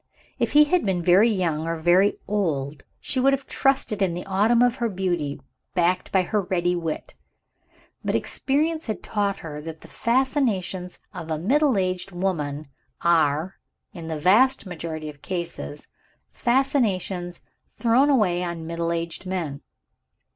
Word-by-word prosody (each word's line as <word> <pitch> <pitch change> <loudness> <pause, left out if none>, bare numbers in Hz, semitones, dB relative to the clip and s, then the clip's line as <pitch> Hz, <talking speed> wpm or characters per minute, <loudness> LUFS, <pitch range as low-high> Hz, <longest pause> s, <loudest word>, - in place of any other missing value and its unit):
If - - 0
he 300 +1 +8
had 345 +4 +2
been 185 -4 0
very 185 +7 +5
young, 165 -6 -1
or 165 - -1
very 175 +5 +3
old, 155 -9 -1 0.2
she 260 - -2
would 270 +2 +4
have 275 0 -2
trusted 270 -6 +1
in 180 -3 +1
the 175 - -5
autumn 215 +5 +3
of 245 0 +2
her 235 -2 0
beauty, 175 -7 -2 0.4
backed 180 +1 +1
by 190 -1 +3
her 210 +3 0
ready 180 -1 0
wit. 165 -3 -4 0.9
But - - 0
experience 315 +3 0
had 215 - -4
taught 200 -2 -1
her 150 -1 -6
that 160 0 -8
the - - -13
fascinations 230 -8 0 0.2
of 165 - -7
a 160 - -1
middle 260 - +2
aged 185 0 -1
woman 155 -6 -2 0.4
are, 160 +1 +2 0.4
in 165 -2 -8
the 160 -1 -3
vast 220 - +4
majority 160 -3 -5
of 145 -2 -10
cases, 170 - -5 0.5
fascinations 205 -9 0 0.3
thrown 250 +4 +3
away 200 -10 +3
on 170 -1 -3
a - - -8
middle 170 +1 -2
aged 170 +2 -3
man. 165 -7 -3
185 Hz, 155 wpm, -24 LUFS, 165-225 Hz, 0.9 s, he